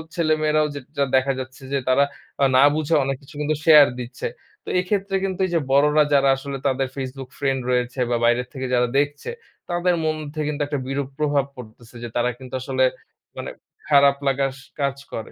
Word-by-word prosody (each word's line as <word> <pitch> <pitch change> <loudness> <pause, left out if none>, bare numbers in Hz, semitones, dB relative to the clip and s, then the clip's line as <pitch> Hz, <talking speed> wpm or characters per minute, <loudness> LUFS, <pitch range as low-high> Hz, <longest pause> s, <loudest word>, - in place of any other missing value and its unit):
ছেলে-মেয়েরাও 155 -2 +2
যে - - -4 0.2
যেটা 140 -1 +2
দেখা 130 +1 +3
যাচ্ছে 130 +1 -8
যে - - +3
তারা 130 +2 +5 0.4
আ - - +7
না 130 - +7
বুঝে 155 +1 -1
অনেক 135 0 -1
কিছু 145 +3 -16
কিন্তু 150 +1 0
শেয়ার 150 -3 +9
দিচ্ছে। 125 +1 -5 0.4
তো - - -30
এক্ষেত্রে 195 +1 -1
কিন্তু 190 -1 -2
এইযে 175 -2 +1
বড়রা 150 +2 +5
যারা 140 -1 +5
আসলে 135 +1 -6
তাদের 135 0 0
Facebook 135 -1 -6
ফ্রেন্ড 135 -2 0
রয়েছে 125 +1 -1
বা 120 - +1
বাইরে 120 +1 +3
থেকে 130 -2 -5
যারা 125 0 +3
দেখছে, 145 0 -2 0.4
তাদের 175 +1 +1
মন 155 0 +1 0.2
থেকে 155 -1 -2
কিন্তু 150 0 -1
একটা 145 -1 -2
বিরূপ 135 0 -2
প্রভাব 145 -2 +2
পড়তেছে 120 -1 -13
যে - - -3
তারা 120 0 +2
কিন্তু 130 0 -12
আসলে 130 0 0 0.5
মানে - - -5 0.4
খারাপ 140 -1 +6
লাগার 135 0 +1
স - - -14 0.2
কাজ 140 -1 +1 0.2
করে। 110 - -5
140 Hz, 190 wpm, -22 LUFS, 130-150 Hz, 0.5 s, শেয়ার